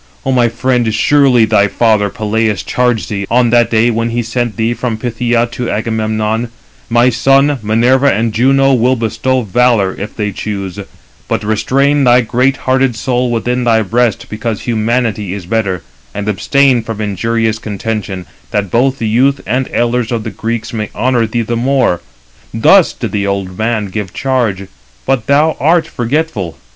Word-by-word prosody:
O 135 - 0
my 120 -2 +3
friend, 120 -1 0
surely 125 +1 +3
thy 100 -1 +3
father 105 -2 +1
Peleus 110 -1 -1
charged 125 -3 0
thee, 100 -2 -3
on 120 -1 +2
that 120 -1 +3
day 115 +1 +2
when 115 +1 -1
he 120 +1 -1
sent 120 0 -2
thee 115 +1 0
from 120 -2 -3
Phthia 120 0 0
to 125 -1 -4
Agamemnon, 110 +1 -1 0.4
'My 120 +2 +3
son, 135 +3 +2
Minerva 125 +6 +3
and 110 +1 -1
Juno 135 +4 +3
will 125 +1 +2
bestow 115 +3 -1
valour, 115 -2 +2
if 105 - -6
they 105 -2 -2
choose; 100 -1 -5 0.5
but - - -2
restrain 135 +7 +1
thy 125 0 +5
great 125 +4 +1
hearted 130 -1 +2
soul 125 +2 -1
within 120 +2 -1
thy 115 -2 +2
breast, 115 +2 0
because 110 0 -4
humanity 110 -4 -1
is 95 -4 -7
better; 95 -3 -1 0.3
and 105 0 -4
abstain 130 +4 +2
from 115 -1 -6
injurious 110 +2 -1
contention, 105 -3 -4 0.2
that 100 -3 -2
both 130 +3 +2
the 115 - -2
youth 130 +6 +2
and 125 +3 -1
elders 120 0 0
of 115 -2 -2
the 110 - -5
Greeks 115 +4 -4
may 105 -2 -3
honour 125 -3 +1
thee 115 +1 -1
the 120 +2 -2
more.' 125 -7 +1 0.5
Thus 170 - +4
did 115 -5 -5
the 100 -1 -1
old 100 -2 -3
man 110 0 -1
give 100 -1 -5
charge, 120 -8 -1 0.4
but 130 -4 0
thou 150 +3 +3
art 160 +4 +3
forgetful. 120 - -2
115 Hz, 165 wpm, -13 LUFS, 110-125 Hz, 0.5 s, thy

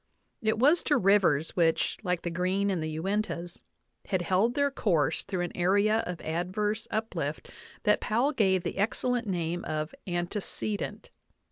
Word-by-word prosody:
It 220 -1 +1
was 290 +9 +5
to 290 - +3
rivers 190 - +3
which, 165 -2 +2
like 180 -4 -1
the 175 - -2
Green 185 +3 0
in 185 - -1
the 155 0 -3
Uintas, 185 -2 -2 0.5
had 185 -2 0
held 195 +8 +2
their 285 0 +2
course 175 - +1
through 185 -2 -3
an 175 - -4
area 200 +5 +3
of 180 -2 -4
adverse 205 +7 -2
uplift 220 +1 -3 0.3
that - - +3
Powell 240 +7 +1
gave 190 - +2
the - - -4
excellent 240 +3 0
name 175 -2 -2
of 155 0 -3
antecedent. 185 +3 -3
190 Hz, 150 wpm, -29 LUFS, 175-215 Hz, 0.5 s, was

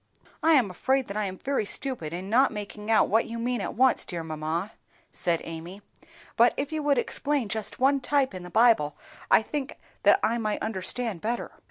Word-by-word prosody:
"I 325 - +4
am 245 -10 +3
afraid 265 +8 0
that 200 - -5
I 215 -1 0
am 190 -1 -5
very 275 +1 -1
stupid 220 - -2
in 180 +3 -5
not 250 +6 +4
making 210 0 -7
out 225 - +4
what 225 +3 +2
you 230 - -5
mean 240 -1 -1
at - - -4
once, 260 +2 +3
dear 170 -3 -5
mamma," 160 +5 -3 0.4
said 170 -2 -1
Amy; 170 +5 -8 0.5
"but 235 +1 +4
if 280 +1 -2
you 310 -1 -2
would 290 -2 +2
explain 280 +1 0
just 215 0 -2
one 275 +2 +3
type 270 -3 +1
in 185 - -7
the 180 - -9
Bible, 220 -9 +3 0.3
I - - +5
think 280 +3 -5 0.2
that - - +5
I 235 +1 +1
might 215 -2 -1
understand 220 -1 -2
better." 235 +2 -3
220 Hz, 200 wpm, -27 LUFS, 185-260 Hz, 0.5 s, I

